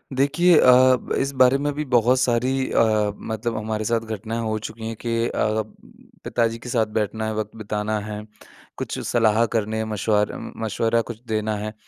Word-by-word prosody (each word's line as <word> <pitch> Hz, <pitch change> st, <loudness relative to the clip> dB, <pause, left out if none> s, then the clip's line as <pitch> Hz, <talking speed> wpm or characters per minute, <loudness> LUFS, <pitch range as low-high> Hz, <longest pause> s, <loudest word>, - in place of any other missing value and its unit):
देखिए 150 Hz, +6 st, +4 dB
अ, 130 Hz, 0 st, +6 dB, 0.2 s
इस 135 Hz, +1 st, 0 dB
बारे 130 Hz, +1 st, +5 dB
में 145 Hz, +1 st, -1 dB
भी 150 Hz, +2 st, -3 dB
बहुत 125 Hz, 0 st, +3 dB
सारी 130 Hz, +2 st, +1 dB
अ, 110 Hz, -2 st, +2 dB
मतलब 110 Hz, +1 st, -4 dB
हमारे 110 Hz, 0 st, -3 dB
साथ 115 Hz, +1 st, +1 dB
घटनाएँ 110 Hz, +1 st, -5 dB
हो 110 Hz, -1 st, -1 dB
चुकी 110 Hz, +1 st, -7 dB
हैं 115 Hz, -, -4 dB
कि 115 Hz, +1 st, -1 dB
अ, 110 Hz, -1 st, 0 dB, 0.6 s
पिताजी 115 Hz, -1 st, 0 dB
के 125 Hz, -, -9 dB
साथ 115 Hz, -2 st, +2 dB
बैठना 110 Hz, +1 st, -1 dB
है 110 Hz, -, -2 dB
वक़्त 110 Hz, 0 st, -4 dB
बिताना 105 Hz, 0 st, -2 dB
है 105 Hz, 0 st, -6 dB, 0.5 s
कुछ -, -, -4 dB
सलाह 115 Hz, -1 st, +3 dB
करने 110 Hz, 0 st, 0 dB
मशवार 105 Hz, 0 st, 0 dB
उम, -, -, -7 dB
मशवरा 115 Hz, +2 st, +1 dB
कुछ 115 Hz, -1 st, -8 dB
देना 110 Hz, -1 st, -1 dB
है। 105 Hz, +1 st, -5 dB
115 Hz, 175 wpm, -23 LUFS, 110-120 Hz, 0.6 s, अ